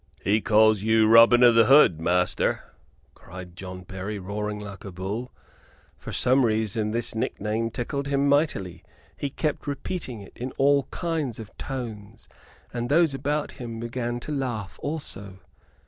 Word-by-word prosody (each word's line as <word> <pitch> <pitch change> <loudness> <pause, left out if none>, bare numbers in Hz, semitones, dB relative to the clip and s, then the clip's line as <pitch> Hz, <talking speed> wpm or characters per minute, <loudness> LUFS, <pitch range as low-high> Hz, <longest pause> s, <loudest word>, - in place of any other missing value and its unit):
"He 105 +2 +2
calls 110 -1 +4
you 110 0 +3
Robin 115 +2 +7
o' 120 -1 +7
th' 115 -1 +5
Hood, 135 - +6
master!" 90 +2 +1 0.5
cried 90 -1 -11
John 90 0 -8
Berry, 95 +3 -6
roaring 105 +2 -4
like 100 0 -9
a 100 - -7
bull. 100 +7 -5 0.7
For - - -8
some 130 +2 +3
reason 110 -1 0
this 115 +2 -1
nick 115 +3 -3
name 110 +3 -1
tickled 140 +4 -4
him 140 0 +1
mightily. 140 - 0 0.3
He 140 - -3
kept 150 +1 -3
repeating 140 - -4
it 100 - -13
in 125 +2 -6
all 140 -1 +3
kinds 160 -9 -3
of 110 -2 -10
tones, 115 -4 -7 0.5
and 120 0 -3
those 160 0 +4
about 145 +2 -2
him 115 -3 -7
began 120 +1 -3
to 150 - -6
laugh 125 -8 -4
also. 105 -11 -6
115 Hz, 155 wpm, -25 LUFS, 105-135 Hz, 0.7 s, Robin